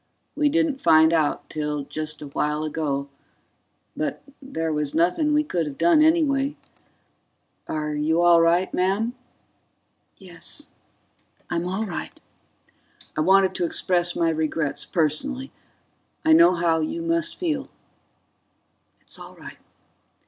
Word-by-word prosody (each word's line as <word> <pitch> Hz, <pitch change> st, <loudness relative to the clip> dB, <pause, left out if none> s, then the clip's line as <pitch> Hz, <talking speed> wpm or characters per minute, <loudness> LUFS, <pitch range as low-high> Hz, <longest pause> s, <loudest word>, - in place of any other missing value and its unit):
We 300 Hz, -1 st, +2 dB
didn't 310 Hz, -3 st, 0 dB
find 160 Hz, +1 st, +5 dB
out 155 Hz, -3 st, 0 dB
till 150 Hz, -1 st, -3 dB
just 155 Hz, +1 st, -6 dB
a -, -, -7 dB
while 150 Hz, +2 st, -1 dB
ago 145 Hz, -3 st, -2 dB, 0.9 s
but -, -, -3 dB, 0.2 s
there 165 Hz, -, -3 dB
was 150 Hz, -1 st, -2 dB
nothing 180 Hz, -, +2 dB
we 300 Hz, 0 st, +3 dB
could 175 Hz, -, -2 dB
have 140 Hz, -, -7 dB
done 330 Hz, -3 st, +4 dB
anyway... 295 Hz, -3 st, +2 dB, 1.1 s
Are 150 Hz, -1 st, -3 dB
you 155 Hz, +3 st, +1 dB
all 175 Hz, -1 st, +6 dB
right, 170 Hz, +3 st, +2 dB
ma'am?" 200 Hz, +6 st, 0 dB, 1.0 s
"Yes. 190 Hz, -, -6 dB, 0.8 s
I'm 175 Hz, 0 st, -1 dB
all 195 Hz, +4 st, -2 dB
right." 180 Hz, -5 st, -6 dB, 1.0 s
"I 155 Hz, -, 0 dB
wanted 190 Hz, +3 st, +4 dB
to -, -, -2 dB
express 175 Hz, 0 st, +1 dB
my 165 Hz, -1 st, +2 dB
regrets 155 Hz, -2 st, -2 dB
personally. 255 Hz, -, -1 dB, 0.7 s
I 320 Hz, -, +6 dB
know 180 Hz, -, +6 dB
how 170 Hz, -1 st, +1 dB
you 330 Hz, -, -3 dB
must 335 Hz, 0 st, 0 dB
feel." 310 Hz, -6 st, -2 dB, 1.3 s
"It's -, -, -6 dB
all -, -, -11 dB
right." -, -, -12 dB
175 Hz, 125 wpm, -24 LUFS, -, 1.3 s, all